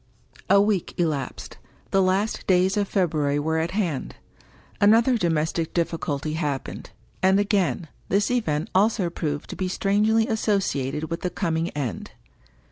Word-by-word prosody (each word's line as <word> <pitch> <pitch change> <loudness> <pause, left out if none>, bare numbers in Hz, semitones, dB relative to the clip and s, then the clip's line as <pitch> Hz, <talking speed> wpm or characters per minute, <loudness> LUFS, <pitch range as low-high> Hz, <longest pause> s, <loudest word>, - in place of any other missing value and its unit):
* - - -24
A 200 - +6
week 200 -3 0
elapsed; 155 -6 -3 0.3
the 195 - +4
last 190 +3 0
days 185 0 +3
of 205 -1 0
February 155 -8 +1
were 160 +2 0
at 165 +1 -1
hand. 170 -10 -2 0.7
Another 225 +5 +5
domestic 165 -4 -1
difficulty 155 -3 -1
happened; 145 -5 -3 0.3
and, 190 +1 +4
again, 190 - 0 0.2
this 200 +4 +2
event 160 -11 -1
also 195 -2 +2
proved 150 -4 -3
to - - -5
be 185 - -2
strangely 210 +4 +2
associated 160 - -1
with 165 - -3
the 180 - -1
coming 165 -2 -1
end. 130 -7 -4
175 Hz, 140 wpm, -24 LUFS, 155-200 Hz, 0.7 s, A